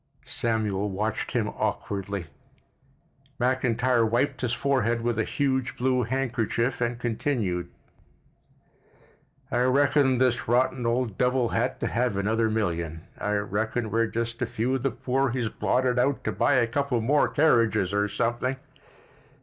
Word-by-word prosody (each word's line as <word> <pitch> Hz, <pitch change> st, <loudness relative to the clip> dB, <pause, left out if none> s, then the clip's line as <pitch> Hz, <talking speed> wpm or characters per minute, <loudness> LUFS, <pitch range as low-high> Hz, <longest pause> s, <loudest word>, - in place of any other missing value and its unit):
Samuel 105 Hz, -3 st, -1 dB
watched 105 Hz, +3 st, -2 dB
him 110 Hz, -4 st, 0 dB
awkwardly. 100 Hz, -2 st, -3 dB, 1.1 s
McIntyre 125 Hz, -2 st, +2 dB
wiped 130 Hz, +3 st, 0 dB
his 125 Hz, -3 st, -1 dB
forehead 120 Hz, -3 st, +1 dB
with 115 Hz, -1 st, -1 dB
a -, -, +3 dB
huge 130 Hz, 0 st, -1 dB
blue 130 Hz, 0 st, +1 dB
handkerchief, 125 Hz, -1 st, -1 dB
and 120 Hz, 0 st, 0 dB
continued: 110 Hz, -7 st, -1 dB, 1.8 s
"I 120 Hz, -, +1 dB
reckon 135 Hz, +1 st, +3 dB
this 125 Hz, -1 st, +1 dB
rotten 125 Hz, +1 st, +1 dB
old 115 Hz, -3 st, -1 dB
devil 125 Hz, -1 st, +2 dB
had -, -, -1 dB
to -, -, 0 dB
have 115 Hz, +2 st, 0 dB
another 110 Hz, +3 st, +1 dB
million. 85 Hz, -7 st, -2 dB, 0.2 s
I 105 Hz, -, -1 dB
reckon 110 Hz, +2 st, -2 dB
we're 115 Hz, +1 st, +2 dB
just 115 Hz, +1 st, -3 dB
a 120 Hz, -, +1 dB
few 120 Hz, +3 st, -1 dB
of 135 Hz, -, 0 dB
the 135 Hz, -, +1 dB
poor 130 Hz, +2 st, 0 dB
he's 120 Hz, -2 st, -1 dB
blotted 125 Hz, +2 st, +1 dB
out 140 Hz, +2 st, +1 dB
to -, -, -1 dB
buy 145 Hz, -, +2 dB
a 125 Hz, -2 st, +4 dB
couple 130 Hz, +1 st, -1 dB
more 140 Hz, +6 st, +3 dB
carriages 115 Hz, -, +2 dB
or 105 Hz, 0 st, +2 dB
something." 120 Hz, +5 st, -1 dB
120 Hz, 140 wpm, -26 LUFS, 110-130 Hz, 1.8 s, a